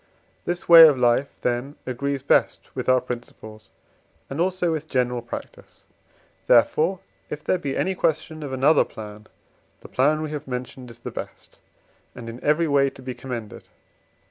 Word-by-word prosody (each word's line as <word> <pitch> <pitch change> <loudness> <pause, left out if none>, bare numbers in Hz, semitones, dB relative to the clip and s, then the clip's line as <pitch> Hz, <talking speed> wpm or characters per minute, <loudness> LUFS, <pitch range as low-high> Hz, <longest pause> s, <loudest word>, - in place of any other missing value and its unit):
This 175 0 -3
way 165 -1 +11
of 145 -3 +2
life, 125 +2 +2
then, 125 +4 -2
agrees 135 +2 -3
best - - +1
with - - -3
our 130 -1 +4
principles, 110 -3 -9 0.6
and 140 +4 -2
also 180 -1 0
with 155 -1 -4
general 125 -2 0
practice; 120 - -10 0.6
therefore, 155 +10 +3 0.3
if 150 0 -6
there 185 - 0
be 140 -4 -3
any 190 - 0
question 160 -2 -1
of 145 -3 -6
another 135 +4 +4
plan, 105 0 -11 0.5
the - - -11
plan 150 +5 +1
we 155 - -5
have 150 -1 -6
mentioned 125 0 -6
is 115 - -12
the 120 - -8
best, - - -9 0.6
and 115 -2 -8
in 115 +2 -10
every 155 +3 +2
way 140 -2 +3
to 135 - -15
be 130 0 -5
commended. 120 -5 -8
135 Hz, 165 wpm, -23 LUFS, 125-155 Hz, 0.6 s, way